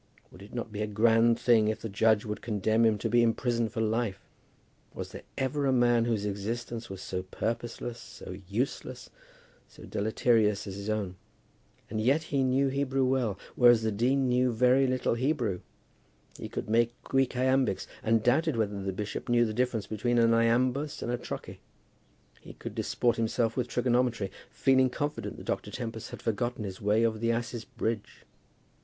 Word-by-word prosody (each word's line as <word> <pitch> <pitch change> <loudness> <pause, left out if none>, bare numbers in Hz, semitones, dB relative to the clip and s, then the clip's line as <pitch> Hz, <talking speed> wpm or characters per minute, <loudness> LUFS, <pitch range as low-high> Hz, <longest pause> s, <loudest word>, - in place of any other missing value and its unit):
Would 90 - -14
it 100 - -12
not 115 -2 -4
be 105 0 -4
a 105 - 0
grand 115 +2 +4
thing 115 -3 +4
if 110 +1 -1
the - - -4
judge 110 +1 +2
would 105 -1 -4
condemn 110 +1 +1
him 110 -2 +3
to - - -2
be 120 0 +4
imprisoned 115 0 +1
for 115 -2 -2
life? 110 -2 0 0.8
Was - - -6
there - - -8 0.2
ever 140 +1 0
a - - +3
man 120 -2 +3
whose 110 -3 0
existence 115 +3 -4
was 95 -1 -7
so 90 -1 -3
purposeless, 115 +4 -4
so 110 -4 -9
useless, 120 +7 -3 0.6
so - - -15
deleterious, 110 0 +1
as 100 - -6
his 100 +1 -5
own? 100 -4 -2 0.7
And 110 0 -3
yet 135 +8 +3
he 140 -3 -1
knew 135 +1 +2
Hebrew 135 -1 0
well, 125 -6 0 0.2
whereas 120 -2 +6
the 110 - +1
dean 130 +6 +1
knew 125 +1 +3
but 115 - -4
very 125 +3 +4
little 130 -2 +1
Hebrew. 120 - 0 0.8
He - - -7
could - - -5
make 120 +2 +1
Greek 135 -1 +1
iambics, 130 -5 +1 0.2
and 110 0 +2
doubted 145 +3 +2
whether 105 -2 -1
the 95 0 -2
bishop 105 +5 -5
knew 120 0 +4
the 110 - -3
difference 120 -2 0
between 120 +3 -1
an 115 -1 +5
iambus 125 +5 +1
and 120 - -2
a 120 - 0
trochee. - - -7 0.8
He - - -12
could - - -8
disport 120 -1 0
himself 115 0 0
with 125 -2 -1
trigonometry, 125 -4 +1 0.2
feeling 130 -1 +3
confident 145 +4 -4
that - - -10
Dr. - - -2
Tempest 115 -3 -5
had - - -9
forgotten 120 +1 -1
his 95 -2 -6
way 105 +3 +3
over 110 -1 0
the 115 +1 +1
asses' 115 0 -3
bridge. 110 -2 -4
115 Hz, 180 wpm, -29 LUFS, 110-125 Hz, 0.8 s, whereas